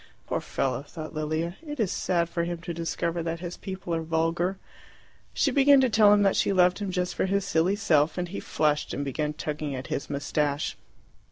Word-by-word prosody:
"Poor - - -2
fellow," 135 -1 -1
thought 155 +2 -8
Lilia. 155 +3 -2
"It 295 -3 -7
is 210 -5 +1
sad 170 -2 0
for 170 0 -2
him 175 0 -3
to 170 0 -5
discover 170 +1 -2
that 165 0 -3
his 175 0 -5
people 190 -3 -5
are 165 - 0
vulgar." 165 +3 0 0.7
She 275 - +1
began 280 +1 +6
to 260 -3 +2
tell 210 -1 +6
him 205 0 +5
that 195 - +3
she - - +2
loved 180 -1 +4
him 200 -2 -3
just 180 -1 -1
for - - 0
his 200 0 0
silly 180 +2 +2
self, 160 -8 +2
and 180 -1 -2
he 195 - -5
flushed 150 -1 0
and 145 - -3
began 150 +2 -2
tugging 150 -2 -4
at 130 0 -5
his - - -3
moustache. 145 0 -1
170 Hz, 205 wpm, -27 LUFS, 155-190 Hz, 0.7 s, began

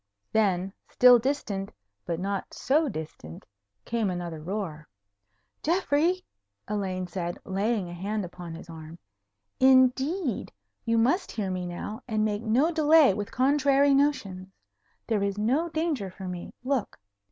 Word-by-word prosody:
Then, 195 -3 +1 0.2
still 250 -1 +7
distant, 220 -7 -2 0.4
but 165 -1 -2
not 195 +1 -3
so 295 +3 +2
distant, 155 - -8 0.4
came 230 -3 0
another 175 -3 -4
roar. 165 -4 -5 0.7
"Geoffrey!" 345 +1 +1 0.4
Elaine 190 -3 -2
said, 175 -1 -4
laying 200 +1 -1
a 175 - -8
hand 200 +3 -3
upon 175 -1 -8
his 165 - -11
arm; 160 0 -10 0.6
"indeed, 265 - +3 0.3
you 230 0 +2
must 270 - +2
hear 200 -4 -2
me 180 -1 -3
now, 175 +5 -6
and 215 -2 +1
make 210 0 -1
no 245 +9 +2
delay 310 - +5
with 205 +1 -4
contrary 280 +1 +3
notions. 210 -10 0 0.6
There 220 -3 0
is 200 0 -1
no 265 +11 +1
danger 315 - -1
for 185 +1 -9
me. 180 -1 -6
Look. 260 -4 -2
215 Hz, 135 wpm, -27 LUFS, 185-275 Hz, 0.7 s, still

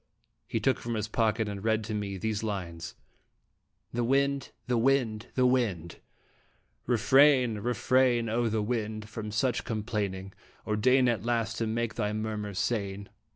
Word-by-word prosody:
He 115 - -1
took 130 +4 +1
from 120 0 -4
his 105 -1 -2
pocket 110 0 +1
and 100 -1 -5
read 110 0 +1
to 110 +1 -5
me 100 -2 -3
these 110 +2 -2
lines: 85 -6 -5 1.0
THE 120 +1 0
WIND! 140 +2 +1 0.2
THE 125 -2 +1
WIND! 120 -3 +1
THE 130 - +3
WIND! 105 -10 0 0.9
Refrain, 125 -1 +4
refrain, 120 +1 +2
O 115 +1 +1
wind! 110 -1 -3
from 110 -1 -6
such 120 +3 0
complaining, 100 -3 -3 0.3
Or 105 - 0
deign 125 +4 +4
at 115 -5 0
last 115 -1 -1
to 115 - 0
make 115 +1 -1
thy 105 -1 -1
murmurs 105 -2 -3
sane. 100 -2 -2
110 Hz, 150 wpm, -29 LUFS, 105-120 Hz, 1.0 s, Refrain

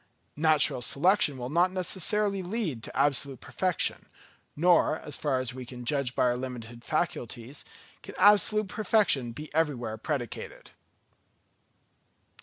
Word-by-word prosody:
Natural 155 -5 +3
selection 145 +2 +2
will 125 +1 -5
not 175 +3 +3
necessarily 195 +2 0
lead 180 - -3
to - - -7
absolute 140 -2 +1
perfection; 185 -3 -1 0.5
nor, 170 -1 +3
as 150 -3 -3
far 135 -4 0
as 130 -1 -3
we 130 0 -7
can 125 0 -9
judge 140 -2 0
by - - +2
our 120 -1 +2
limited 120 -2 -7
faculties, 135 -5 -3 0.4
can - - -10
absolute 210 +1 +4
perfection 205 - +1
be 150 +6 -9
everywhere 135 -8 -1
predicated. 135 -7 -5
145 Hz, 125 wpm, -28 LUFS, 125-180 Hz, 0.5 s, absolute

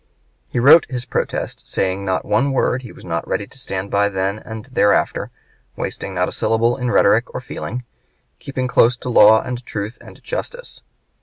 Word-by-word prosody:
He - - -4
wrote 145 +6 +7
his 125 -2 -4
protest, - - -3
saying 95 +1 -1
not 95 -1 -1
one 135 +7 +1
word 130 -1 +1
he 120 - -10
was - - -14
not 85 -1 -3
ready 100 - -1
to 135 - -13
stand 95 -5 -5
by 100 0 +2
then 95 +1 -2
and 110 0 -8
thereafter, 115 -6 +1 0.5
wasting 95 - -5
not 90 0 +1
a - - -5
syllable 115 +2 +1
in 125 -1 -2
rhetoric - - +3
or - - -1
feeling, 125 +2 -6 0.6
keeping 130 -2 -3
close 125 0 +4
to 125 - -6
law 110 -2 +6
and 125 0 -5
truth 105 +1 -5
and - - -14
justice. - - -6
115 Hz, 180 wpm, -20 LUFS, 100-125 Hz, 0.6 s, wrote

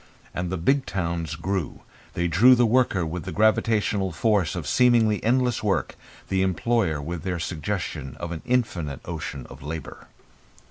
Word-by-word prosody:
And 90 0 -3
the 95 - -2
big 135 +11 +1
towns 85 -5 -2
grew. 90 +1 -3 0.3
They 85 0 0
drew 120 +9 +6
the 120 0 +4
worker 115 -6 +2
with 80 +1 -4
the - - -4
gravitational 105 -3 +2
force 100 -2 +1
of 85 -4 -4
seemingly 115 -1 +3
endless 125 +1 +2
work, 105 -3 0 0.3
the 95 0 +1
employer 95 -2 +1
with 80 +3 -5
their 90 -1 -2
suggestion 80 -5 -4
of 85 - -5
an 80 -2 -5
infinite 90 - -1
ocean 75 -5 -5
of - - -12
labour. 80 +3 -7
95 Hz, 155 wpm, -25 LUFS, 80-110 Hz, 0.3 s, drew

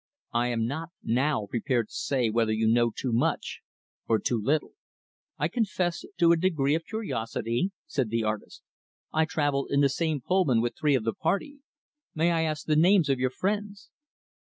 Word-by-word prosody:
I 120 +1 +2
am 115 -2 0
not, 160 +8 -4
now, 130 -1 +1
prepared 120 +1 -1
to - - -17
say 125 -5 0
whether 115 -1 +1
you 110 0 +1
know 120 +1 +4
too 125 +2 -4
much 115 - 0 0.5
or 115 - +3
too 110 +2 -1
little." 145 +7 0 0.7
"I - - +1
confess 185 -7 -1
to 170 -1 +5
a 170 - +5
degree 160 -5 +1
of 165 +1 -1
curiosity," 120 - -2 0.2
said 130 -5 -1
the 115 0 0
artist. 110 -1 -4 0.5
"I 160 0 +3
traveled 145 -4 0
in 140 0 +2
the 140 - +4
same 155 +2 -1
Pullman 150 -4 +2
with 120 +1 -1
three 150 -2 +2
of 125 - 0
the 115 0 -1
party. 240 - -2 0.6
May 165 +2 +2
I 165 -1 +1
ask 155 -1 -2
the 155 - +2
names 175 0 +4
of 135 -2 +2
your 130 0 +1
friends?" 205 +6 -3
140 Hz, 185 wpm, -27 LUFS, 120-170 Hz, 0.7 s, to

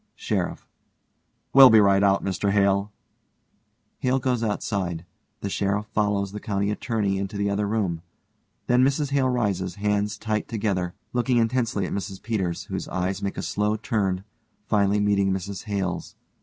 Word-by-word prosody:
SHERIFF: - - -3 0.9
We'll 135 -1 +10
be 110 - +7
right 100 -1 +4
out, 100 -1 +3
Mr 100 +1 0
Hale. 100 0 +2 1.1
(HALE 130 +1 +1
goes 125 -2 0
outside. 95 -5 -2 0.4
The 100 - -3
SHERIFF 100 +2 0
follows 105 -2 0
the 105 - -6
COUNTY 100 -1 -1
ATTORNEY 105 -3 -1
into 100 +1 -4
the 100 0 0
other 100 +1 0
room. 100 -6 -1 0.6
Then 125 +1 +4
MRS 140 +1 +1
HALE 135 -2 +2
rises, 100 -7 -1
hands 105 0 0
tight 110 -1 -2
together, 100 -6 -2 0.2
looking 125 0 +1
intensely 115 -3 +1
at - - -4
MRS 95 0 -5
PETERS, 95 -7 -2
whose - - -5
eyes 90 +1 -2
make 100 - -3
a - - -3
slow 105 +1 0
turn, 100 -4 -1 0.4
finally 105 -1 +2
meeting 100 -1 +2
MRS 95 +1 -4
HALE_'s. 95 -4 -3
100 Hz, 155 wpm, -25 LUFS, 95-110 Hz, 1.1 s, We'll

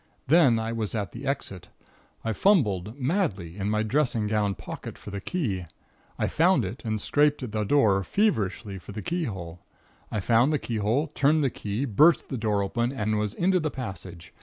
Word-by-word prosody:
Then 140 -5 +5
I 110 0 -2
was 115 -2 -3
at 100 -4 -2
the 130 +4 -7
exit. 100 - -3 0.6
I 115 - 0
fumbled 110 - +2
madly 125 - -1
in 100 0 -2
my 110 0 +1
dressing 120 -2 +1
gown 105 -2 0
pocket - - -8
for 105 - -10
the 100 0 -5
key. 105 - -2 0.5
I - - 0
found - - +3
it - - -7
and 110 -1 -2
scraped 145 +5 +2
at 120 - -5
the 105 0 -1
door, 105 -5 +3
feverishly, 105 - 0
for 95 - -11
the 105 0 -6
keyhole. 95 - -4 0.5
I 110 - -1
found 115 +7 +3
the 150 - +2
keyhole, 115 +3 0
turned 150 +2 +3
the 135 - +1
key, 105 +6 -3
burst 150 +8 +4
the 130 - -3
door 105 -2 +1
open, 120 +5 -1
and 110 -5 -1
was 105 0 -2
into 185 +1 +2
the 155 -2 -1
passage. 95 - -8
110 Hz, 185 wpm, -26 LUFS, 100-140 Hz, 0.6 s, Then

